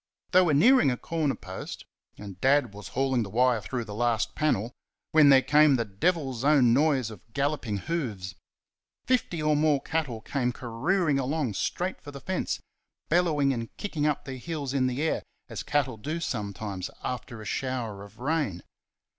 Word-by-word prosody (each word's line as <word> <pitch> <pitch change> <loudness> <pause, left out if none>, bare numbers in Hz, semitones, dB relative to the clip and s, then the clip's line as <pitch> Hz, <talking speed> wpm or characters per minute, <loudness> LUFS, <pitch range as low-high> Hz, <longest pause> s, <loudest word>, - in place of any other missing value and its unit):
They 185 - +7
were 165 -5 +3
nearing 245 - +6
a 125 - -1
corner 155 -2 -1
post, 95 +1 -8 0.3
and 100 -3 -10
Dad 140 -5 +3
was 105 0 -9
hauling 130 -1 0
the 105 - -4
wire 120 +1 +2
through 120 +4 -4
the 105 - -7
last 120 +1 0
panel, 120 -7 0 0.4
when 155 -2 +7
there 135 -1 +7
came 150 -1 +5
the 115 -2 0
devil's 130 - -1
own 140 -5 +5
noise 135 -4 +2
of 105 - -11
galloping 140 -7 -1
hoofs. 110 - -3 0.7
Fifty 205 -11 0
or 150 0 +3
more 150 -1 +3
cattle 145 -6 -2
came 125 +1 -1
careering 140 +7 0
along 135 -3 -1
straight 180 - -2
for 145 - -10
the 140 -1 -8
fence, 185 +5 -2 0.5
bellowing 155 -5 +3
and 115 -2 -6
kicking 155 -7 -1
up 150 - -1
their 135 -1 -6
heels 145 -1 -4
in 130 -2 +2
the 130 +4 -2
air, 160 - 0 0.3
as - - -5
cattle 135 -5 0
do 155 +9 -4
sometimes 100 - -4
after 120 -2 -5
a 110 - -9
shower 120 -5 -3
of 100 +1 -14
rain. 130 - -1
135 Hz, 170 wpm, -27 LUFS, 115-155 Hz, 0.7 s, They